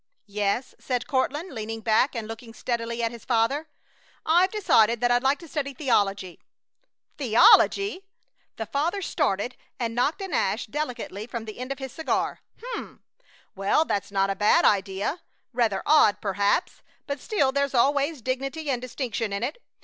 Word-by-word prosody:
"Yes," 210 +4 -1
said 250 -2 -2
Courtland, 295 +4 -1
leaning 225 -1 -5
back 225 +5 +2
and 225 -2 -4
looking 225 +1 -9
steadily 235 -1 -3
at 230 - 0
his 235 -2 -11
father. 255 +6 +1 0.6
"I've 350 +4 +4
decided 235 - +3
that 245 0 +2
I'd 245 0 +3
like 270 +2 +2
to 335 - -12
study 280 -3 -3
theology." 200 - 0 0.8
"Theology!" 375 - +5 0.5
The 225 - -4
father 335 - -1
started 250 - -1 0.2
and 230 -2 -2
knocked 265 - 0
an 380 -5 -6
ash 210 -1 0
delicately 235 -5 -4
from 235 -2 -5
the 215 +1 -9
end 255 +2 -5
of 275 - -3
his 265 -1 -6
cigar. 320 +4 -2 0.2
"H'm! - - -7 0.5
Well, 195 +11 +2
that's 200 -6 -2
not 195 0 +1
a - - -2
bad 210 +2 +4
idea! 200 - +1 0.3
Rather 225 -5 +1
odd, 285 -9 +5
perhaps, 200 - 0 0.2
but 280 -1 -4
still 280 - +1
there's 280 0 0
always 280 +2 +2
dignity 275 +4 -2
and 245 -2 -1
distinction 240 -3 -3
in 200 +3 -2
it. 295 - -4
245 Hz, 160 wpm, -25 LUFS, 220-290 Hz, 0.8 s, Theology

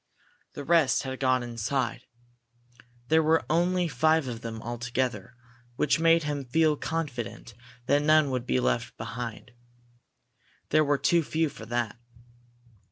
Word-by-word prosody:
The 145 - -6
rest 155 -4 +3
had 130 -1 -5
gone 130 -2 +2
inside. 120 +1 -3 1.0
There 160 0 +5
were 160 +1 +2
only 180 +1 +2
five 160 -2 +2
of 120 -2 -5
them 115 -1 -6
altogether, 120 -1 -3 0.4
which 150 - +1
made 165 0 +4
him 145 -1 -3
feel 155 +4 +2
confident 140 -8 -5 0.3
that 145 +3 +3
none 155 -1 +4
would 125 -1 -3
be 130 - +2
left 120 -1 -1
behind. 115 +1 -6 1.2
There 155 +1 +4
were 145 -1 +2
too 170 +4 +3
few 160 0 -1
for 115 -4 -11
that. 120 -1 -2
135 Hz, 135 wpm, -27 LUFS, 120-155 Hz, 1.2 s, There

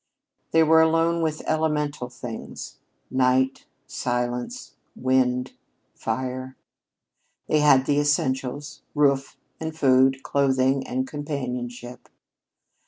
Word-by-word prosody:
They 165 0 +4
were 160 +1 +6
alone 165 +1 +2
with 155 -1 -2
elemental 150 -4 -1
things 120 -2 -8 0.3
night, 130 0 +1 0.2
silence, 125 - -3 0.2
wind, 125 -1 +1
and - - -28 0.4
fire. 130 0 -4 0.9
They 155 - +2
had 135 -3 +5
the 145 +1 +2
essentials, 145 0 -1
roof 140 -2 +2 0.2
and 160 0 -5
food, 130 -1 +4
clothing 135 -1 +1
and 130 +1 -2
companionship. 125 -4 -5
135 Hz, 100 wpm, -24 LUFS, 130-150 Hz, 0.9 s, were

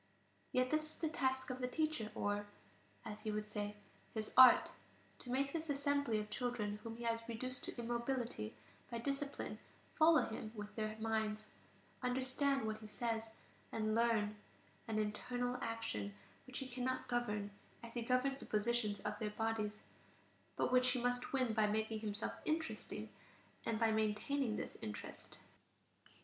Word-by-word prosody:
Yet 255 0 +2
this 310 0 +2
is 310 - -13
the 320 - -1
task 260 -3 +1
of 255 - -4
the 250 - 0
teacher, 305 -5 0
or, 205 0 0 0.6
as 215 -1 -5
he 215 - -2
would 210 0 -1
say, 210 -1 -3 0.4
his 215 -1 -1
"art": 255 -1 +9 0.5
to 245 - -8
make 275 +2 +1
this 325 -1 -2
assembly 285 -4 +2
of 210 0 -5
children 215 -4 -1
whom 225 +1 -6
he 235 - -6
has 230 0 0
reduced 255 +2 -3
to - - -6
immobility 235 - -1 0.3
by 235 - -2
discipline 275 +3 -2 0.3
follow 320 0 +6
him 220 0 -5
with 210 0 -6
their 215 -1 -2
minds, 220 -1 0 0.5
understand 260 +1 +1
what 215 0 -2
he 215 - -9
says, 225 +1 -1 0.4
and 215 -1 +1
learn; 220 -2 +3 0.5
an 220 -1 0
internal 245 +4 0
action, 105 - -2 0.3
which 255 - -5
he 265 - -2
cannot 255 +1 -1
govern, 210 -4 0 0.3
as 230 0 -8
he 240 - -1
governs 255 +3 +2
the - - -8
position 215 0 +2
of 210 0 -2
their 215 - 0
bodies, 215 -1 -1 0.7
but - - +1
which 255 0 +5
he 255 - +1
must 245 +1 0
win 255 -4 +2
by 215 -1 +4
making 220 +1 0
himself 210 -1 -2
interesting, 320 +1 -2 0.6
and 225 -1 +1
by 225 -1 +4
maintaining 220 +3 +1
this - - -4
interest. 105 - -6
230 Hz, 160 wpm, -39 LUFS, 215-255 Hz, 0.7 s, art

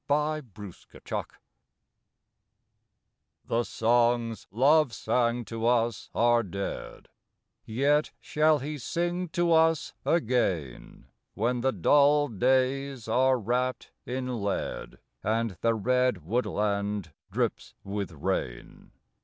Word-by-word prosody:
CONCLUSION 140 - -3 2.4
The 115 +1 0
songs 115 -1 +1
Love 140 +4 +3
sang 120 0 0
to 115 +1 -3
us 120 -2 +1
are 120 0 +4
dead: 100 -1 -6 0.6
Yet 140 +6 +2
shall 155 0 +2
he 145 +2 -5
sing 175 +5 -2
to 175 0 +1
us 160 -1 +3
again, 110 - -1 0.3
When 120 +3 0
the 130 +2 +2
dull 145 - +4
days 130 +2 0
are 130 +3 +3
wrapped 125 +3 -2 0.2
in 125 -2 -3
lead, 100 0 -3 0.2
And 115 +1 0
the 115 0 +2
red 125 -5 +1
woodland 100 - -1 0.2
drips - - -2
with 100 -1 -4
rain. 65 -5 -4
120 Hz, 95 wpm, -28 LUFS, 110-140 Hz, 2.4 s, are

